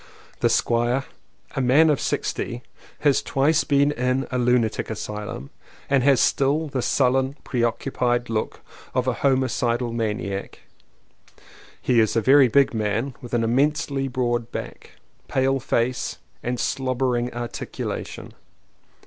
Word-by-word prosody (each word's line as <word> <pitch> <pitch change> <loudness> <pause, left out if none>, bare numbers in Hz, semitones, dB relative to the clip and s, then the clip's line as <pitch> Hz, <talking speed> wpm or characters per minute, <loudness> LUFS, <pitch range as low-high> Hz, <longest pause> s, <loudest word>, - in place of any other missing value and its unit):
The - - +3
Squire, 120 +3 +1 0.5
a 135 - 0
man 145 +5 +5
of 145 - 0
sixty, 120 +1 -2 0.4
has 145 -3 +3
twice 150 +4 +2
been 140 0 +3
in 130 0 0
a 125 - 0
lunatic 120 -2 +1
asylum 110 +5 -6 0.4
and 140 -2 +4
has 135 0 +4
still 145 +4 +2
the 135 -2 -2
sullen, 130 +2 +1
pre 125 - -2
occupied 120 +1 0
look 110 -1 -3 0.3
of 130 -1 +1
a 130 - +2
homicidal 125 -2 0
maniac. 105 -3 -3 1.2
He 120 -2 +2
is 110 0 +2
a - - +4
very 135 +3 +6
big 140 +3 +3
man 110 +4 -1
with 120 -1 -4
an 115 - +1
immensely 140 +3 +1
broad 120 -2 -1
back, - - -7 0.3
pale 135 +1 +1
face 125 0 -1 0.2
and 125 0 -3
slobbering 130 -2 0
articu 120 -1 -5
lation. - - -5
125 Hz, 130 wpm, -23 LUFS, 120-135 Hz, 1.2 s, very